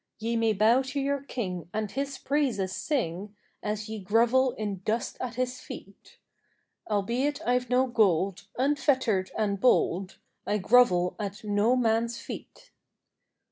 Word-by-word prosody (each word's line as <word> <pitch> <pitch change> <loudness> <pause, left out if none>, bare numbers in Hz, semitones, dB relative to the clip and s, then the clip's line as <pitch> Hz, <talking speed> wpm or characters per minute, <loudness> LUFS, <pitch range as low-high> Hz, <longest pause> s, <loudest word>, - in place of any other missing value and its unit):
Ye 230 +1 -2
may 225 -1 +2
bow 220 +5 +4
to 270 +2 -4
your 280 0 0
King, 185 - -5
and 215 -2 -2
his 275 0 -3
praises 245 -10 0
sing, 205 - -2 0.3
As 210 +1 -3
ye 220 0 -5
grovel 235 +6 +3
in 205 -3 -4
dust 225 +3 -1
at 250 -2 -4
his 255 0 -2
feet; - - -12 0.7
Albeit 235 +8 0
I've 250 0 +1
no 250 +1 +3
gold, 200 -5 +1
unfettered 260 -8 +1
and 200 -2 0
bold, 190 -6 +2 0.3
I 210 - +1
grovel 190 -4 +4
at 205 +2 -5
no 210 +4 +2
man's 230 -1 +1
feet. - - -10
225 Hz, 140 wpm, -28 LUFS, 200-255 Hz, 0.7 s, bow